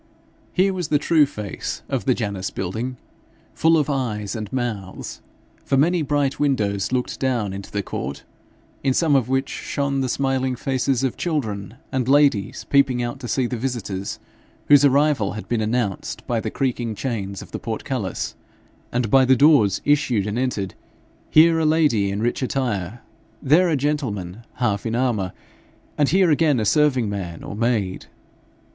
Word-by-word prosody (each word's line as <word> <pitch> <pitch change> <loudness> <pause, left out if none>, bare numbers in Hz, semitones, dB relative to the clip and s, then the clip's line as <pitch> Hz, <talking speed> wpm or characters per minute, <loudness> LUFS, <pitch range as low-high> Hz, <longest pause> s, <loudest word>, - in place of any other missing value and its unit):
Here 195 +1 +2
was 180 -4 -3
the 150 - +3
true 150 0 +3
face 105 -7 -6
of 135 -3 -2
the 130 -3 +3
Janus 100 -5 -3
building, 115 +8 -4 0.6
full 165 0 +4
of 150 - +1
eyes 115 -8 -2
and 110 -2 -5
mouths; 110 -7 -4 0.4
for 135 - +1
many 170 +5 +3
bright 145 -1 0
windows 105 -9 0
looked 125 -1 -2
down 120 -7 0
into 100 0 -7
the 100 -1 -2
court, 70 -5 -5 0.6
in 135 -2 +2
some 160 -4 +3
of 130 -2 +2
which 135 +1 +1
shone 140 -1 -2
the 130 - -1
smiling 130 0 0
faces 130 0 0
of 130 - -1
children 110 - -3 0.2
and 130 -2 -1
ladies 135 -8 +3
peeping 135 -3 +2
out 120 +3 -4
to 125 - -6
see 130 +1 0
the 125 0 -3
visitors, 110 -6 -3 0.5
whose 145 -1 +7
arrival 140 -6 +3
had 110 - -7
been 120 -2 0
announced 110 -3 -2
by 120 -2 0
the 110 - -3
creaking 120 -3 -2
chains 100 -5 -4
of - - -16
the - - -4
portcullis; 115 -3 -3 0.6
and 120 -3 -1
by 135 -1 +6
the 130 0 +5
doors 135 - +4
issued 145 -8 +2
and 105 +3 -2
entered, 105 -7 -2 0.6
here 165 +1 +6
a - - +1
lady 150 -11 +3
in 100 +3 -2
rich 120 - 0
attire, 120 -5 -2 0.4
there 160 +6 +4
a 160 - +2
gentlemen 120 - -2 0.2
half 110 -5 0
in 115 - -1
armour, 115 -7 0 0.6
and 145 -2 +2
here 185 -1 +4
again 150 -3 +3
a 110 - 0
serving 135 -3 +3
man 95 -5 -5
or - - -6
maid. 110 -4 -1
125 Hz, 165 wpm, -22 LUFS, 105-140 Hz, 0.6 s, whose